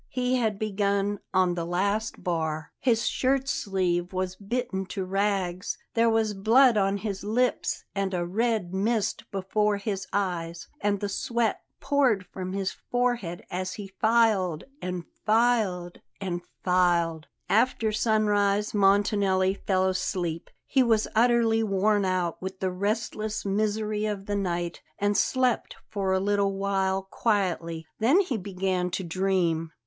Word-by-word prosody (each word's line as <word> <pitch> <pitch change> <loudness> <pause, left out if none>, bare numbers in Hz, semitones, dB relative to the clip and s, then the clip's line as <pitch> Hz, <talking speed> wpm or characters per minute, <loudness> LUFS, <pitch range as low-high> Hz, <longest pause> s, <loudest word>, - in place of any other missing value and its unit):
He 250 0 0
had 220 -4 0
begun 200 -1 0
on 185 -1 +3
the 175 -1 -2
last 200 +6 -1
bar. 160 -3 -2
His 230 -3 +2
shirt 270 +1 +1
sleeve 180 -5 0
was 185 0 -2
bitten 200 -2 -3
to 185 0 -4
rags; 190 -2 -1 0.2
there 230 0 +3
was 225 -1 +1
blood 230 +5 +5
on 195 -1 +2
his 200 -2 -4
lips 245 +5 0
and 195 -1 -1
a 175 -2 -1
red 215 -1 0
mist 210 +2 -1
before 205 +2 0
his 200 -2 -3
eyes, 175 -4 -2
and 205 -1 0
the 205 - -1
sweat 230 +2 -1 0.2
poured 255 -10 +2
from 185 0 -6
his 195 -1 -1
forehead 245 -8 -2
as 185 +1 -3
he 200 -2 -7
filed, 215 -8 +3 0.2
and 180 -1 -3 0.2
filed, 215 -6 +1 0.2
and 180 -3 -3 0.2
filed 170 -3 +2 0.2
After 225 0 +2
sunrise 210 -2 +2
Montanelli 195 -1 +3
fell 190 -1 0
asleep. 180 -3 -2 0.2
He 270 - +2
was 225 -3 +3
utterly 230 -1 +3
worn 205 0 +2
out 180 -2 -1
with 190 0 -6
the 190 -1 -1
restless 215 +2 -2
misery 210 +1 0
of 200 -2 -4
the 205 - -2
night 175 -3 -2 0.2
and 205 0 +1
slept 255 +2 +1 0.2
for 195 -2 -1
a 190 - +3
little 200 0 +1
while 195 -1 0
quietly; 180 -6 -1
then 265 - +5
he 345 - -2
began 185 -2 -1
to 190 - -3
dream. 170 -2 0
200 Hz, 140 wpm, -27 LUFS, 185-215 Hz, 0.2 s, blood